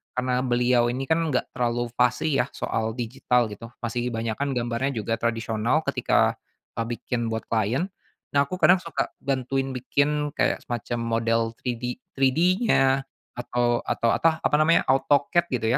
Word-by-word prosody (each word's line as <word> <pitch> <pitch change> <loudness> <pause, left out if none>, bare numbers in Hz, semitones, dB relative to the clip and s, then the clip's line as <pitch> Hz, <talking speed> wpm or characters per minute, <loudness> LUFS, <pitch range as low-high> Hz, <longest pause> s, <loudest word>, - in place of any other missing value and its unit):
karena 125 0 0
beliau 120 -1 +2
ini 125 +3 -2
kan 160 +5 +1
enggak 130 -5 -1
terlalu 120 -1 -1
fasih 125 +6 +2
ya - - -6
soal 110 0 -2
digital 120 -1 0
gitu, 105 +3 -8 0.2
masih 120 +1 -2
kebanyakan 115 +4 -2
gambarnya 120 +2 -1
juga 115 +1 -1
tradisional 115 +5 0
ketika, - - +1 0.4
eee, 115 - 0
bikin, 120 0 -3
buat 110 0 -3
klien. 115 - 0 0.4
Nah, 140 - +5
aku 180 +6 -6
kadang 185 - +7
suka 170 - -2 0.2
bantuin 135 0 -1
bikin 145 +3 0
kayak - - +1
semacam 120 0 -3
model 115 0 +1 0.2
3D 125 0 -3 0.2
3D-nya 135 - +2 0.3
atau 120 0 0
atau 115 - +1
atah 160 -1 +1
apa - - +3
namanya, 160 +2 +4
AutoCAD 145 +6 +2
gitu 115 -5 -1
125 Hz, 150 wpm, -25 LUFS, 115-140 Hz, 0.4 s, kadang